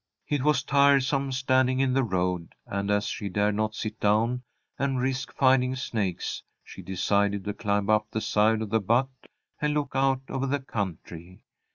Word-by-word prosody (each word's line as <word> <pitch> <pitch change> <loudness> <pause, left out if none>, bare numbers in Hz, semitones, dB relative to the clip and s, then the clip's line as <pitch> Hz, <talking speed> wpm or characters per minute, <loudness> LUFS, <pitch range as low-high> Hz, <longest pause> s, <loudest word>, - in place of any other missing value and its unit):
It 145 -2 0
was 145 -2 +2
tiresome 140 -1 +3
standing 130 0 +2
in 135 -1 +2
the 135 0 +2
road, 90 -5 -2
and, 100 0 -3
as 105 0 +1
she 100 - -4
dared 105 +2 +1
not 110 +1 -1
sit 110 0 -5
down 115 +4 +2 0.4
and 135 -2 0
risk 135 +1 -2
finding 130 -1 +3
snakes, 105 -8 -3 0.2
she - - -11
decided 100 +1 0
to 105 - -2
climb 100 -1 -1
up 105 0 +2
the 110 - -2
side 110 +1 +2
of 105 - -7
the 110 - +3
butte 125 +6 0 0.3
and 150 0 +1
look 145 -2 -1
out 135 -1 +2
over 135 0 -2
the 140 +2 0
country. 90 - -6
115 Hz, 175 wpm, -27 LUFS, 100-135 Hz, 0.4 s, tiresome